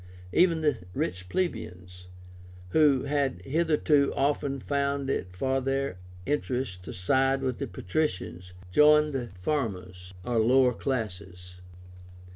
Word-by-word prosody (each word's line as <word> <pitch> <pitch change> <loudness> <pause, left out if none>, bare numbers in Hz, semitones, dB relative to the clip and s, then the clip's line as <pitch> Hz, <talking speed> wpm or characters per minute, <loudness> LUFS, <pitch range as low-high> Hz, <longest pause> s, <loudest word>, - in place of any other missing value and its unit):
Even 170 -2 +4
the 150 -1 +1 0.2
rich 90 +1 -3
plebeians, 90 - -4 0.6
who 140 - +4
had 140 -7 0
hitherto 150 - +2
often 140 0 0
found 140 0 -1
it 90 -7 -3
for 135 +7 0
their 135 -7 -2 0.3
interest 130 -8 -2
to - - -6
side 135 +8 +1
with 130 -2 -2
the - - -3
patricians, 90 - -3 0.2
joined 150 +5 +5
the 125 -3 -2
farmers 90 -8 -3
or 115 +3 0
lower 125 +2 +4
classes. 90 -8 -5
130 Hz, 115 wpm, -28 LUFS, 90-140 Hz, 0.6 s, joined